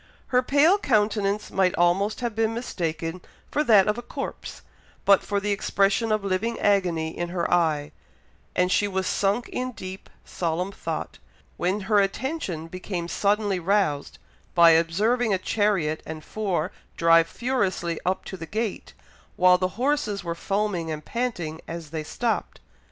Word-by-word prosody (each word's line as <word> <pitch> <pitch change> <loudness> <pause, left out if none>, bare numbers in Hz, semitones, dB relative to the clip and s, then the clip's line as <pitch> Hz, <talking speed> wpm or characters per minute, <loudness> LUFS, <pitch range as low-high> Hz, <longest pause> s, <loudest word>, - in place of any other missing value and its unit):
Her 250 0 +4
pale 295 +9 +4
countenance 210 - +1
might 190 -2 +2
almost 190 +6 +2
have 235 -3 -2
been 225 0 +1
mistaken 165 -6 -3 0.3
for 300 - +1
that 210 -6 +6
of 210 +3 0
a - - -5
corpse, 240 - -7 0.4
but 200 -1 +6
for 200 -1 -1
the 205 +1 -2
expression 200 +2 +1
of 215 -1 +1
living 200 +4 -1
agony 175 -6 +1
in 175 0 -3
her 175 -1 -1
eye; 155 -4 +1 0.6
and 180 0 +2
she 205 - +3
was 190 -1 -2
sunk 205 +6 0
in 255 0 -3
deep, 190 -2 -8 0.2
solemn 175 +2 -2
thought, - - -5 0.4
when 185 +4 -1
her 210 +1 +3
attention 195 - -2
became 180 0 -5
suddenly 200 +2 +1
roused 175 -6 0 0.4
by 170 -1 +8
observing 205 +8 +2
a - - 0
chariot 185 -6 0
and 155 -1 -7
four 190 -5 -2 0.3
drive 165 0 +5
furiously 190 -9 -1
up 185 +1 -1
to - - -6
the 165 -1 -7
gate, 215 +3 -3 0.4
while 180 0 +5
the 185 - +1
horses 260 -7 0
were 170 -1 -2
foaming 195 -2 -1
and 155 -1 -5
panting 180 -11 -3
as 165 -2 -7
they 160 -1 -3
stopped. 230 +8 -2
195 Hz, 155 wpm, -25 LUFS, 170-215 Hz, 0.6 s, by